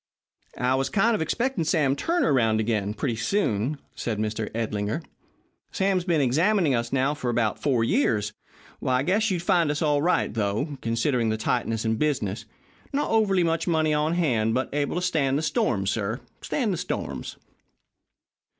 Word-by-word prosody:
"I 125 Hz, +1 st, +1 dB
was 135 Hz, 0 st, 0 dB
kind 225 Hz, +8 st, +3 dB
of 215 Hz, -, 0 dB
expecting 240 Hz, -, 0 dB
Sam 150 Hz, -4 st, +2 dB
Turner 335 Hz, -, +1 dB
round 110 Hz, -4 st, +3 dB
again, 105 Hz, -2 st, -1 dB
pretty 125 Hz, -3 st, -1 dB
soon," 130 Hz, -, 0 dB, 0.2 s
said 115 Hz, -3 st, -3 dB
Mr. 110 Hz, 0 st, -2 dB
Edlinger. 110 Hz, +4 st, -2 dB, 0.7 s
"Sam's 190 Hz, -2 st, +1 dB
been 165 Hz, -5 st, +2 dB
examining 160 Hz, -, +2 dB
us 120 Hz, -1 st, -1 dB
now, 135 Hz, +2 st, +1 dB
for 130 Hz, -5 st, -3 dB
about 115 Hz, -2 st, 0 dB
four 125 Hz, -6 st, +2 dB
years. 110 Hz, -4 st, +1 dB, 0.5 s
I 130 Hz, 0 st, +2 dB
guess 205 Hz, +7 st, +2 dB
you'll 180 Hz, -3 st, -1 dB
find 175 Hz, -3 st, +2 dB
us 150 Hz, +2 st, -1 dB
all 145 Hz, -2 st, +2 dB
right, 175 Hz, -6 st, +1 dB
though, 115 Hz, +7 st, -2 dB
considering 115 Hz, +1 st, 0 dB
the 110 Hz, -, 0 dB
tightness 115 Hz, 0 st, -1 dB
in 110 Hz, 0 st, +1 dB
business. 110 Hz, -8 st, -1 dB, 0.5 s
Not 285 Hz, +1 st, -1 dB
overly 200 Hz, -5 st, +3 dB
much 165 Hz, +1 st, 0 dB
money 160 Hz, -2 st, +2 dB
on 150 Hz, +2 st, +1 dB
hand, 115 Hz, -10 st, +1 dB
but 130 Hz, +1 st, -2 dB
able 145 Hz, +1 st, -1 dB
to 180 Hz, -, -1 dB
stand 145 Hz, -7 st, +1 dB
the 155 Hz, -, -2 dB
storms, 100 Hz, -9 st, 0 dB
sir, 110 Hz, +3 st, -2 dB, 0.2 s
stand 230 Hz, -8 st, -1 dB
the -, -, -2 dB
storms." 180 Hz, +2 st, -4 dB
140 Hz, 170 wpm, -25 LUFS, 115-170 Hz, 0.7 s, kind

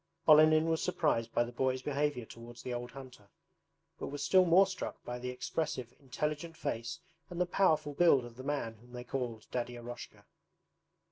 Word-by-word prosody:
Olenin 155 Hz, +1 st, +7 dB
was 160 Hz, -1 st, +1 dB
surprised 150 Hz, -10 st, 0 dB
by -, -, +2 dB
the 120 Hz, -, -7 dB
boys' 130 Hz, +1 st, 0 dB
behavior 145 Hz, -3 st, -1 dB
towards 120 Hz, +1 st, -11 dB
the 125 Hz, -, -4 dB
old 120 Hz, 0 st, -4 dB
hunter, 130 Hz, -6 st, -12 dB, 0.7 s
but -, -, -4 dB
was 145 Hz, 0 st, -4 dB
still 185 Hz, -1 st, +5 dB
more 180 Hz, +3 st, +6 dB
struck 190 Hz, 0 st, -6 dB
by 125 Hz, 0 st, -4 dB
the 125 Hz, +1 st, -4 dB
expressive, 130 Hz, -1 st, -3 dB
intelligent 150 Hz, +4 st, -3 dB
face 115 Hz, +1 st, -3 dB, 0.3 s
and 175 Hz, -, -6 dB
the 180 Hz, -, +3 dB
powerful 160 Hz, -5 st, +2 dB
build 140 Hz, -6 st, +4 dB
of 120 Hz, -1 st, -11 dB
the 130 Hz, -, -9 dB
man 135 Hz, -6 st, -2 dB
whom 120 Hz, +1 st, -18 dB
they 120 Hz, 0 st, -6 dB
called 120 Hz, -4 st, -4 dB
Daddy 120 Hz, 0 st, -2 dB
Eroshka. 120 Hz, +1 st, -9 dB
130 Hz, 180 wpm, -33 LUFS, 120-155 Hz, 0.7 s, Olenin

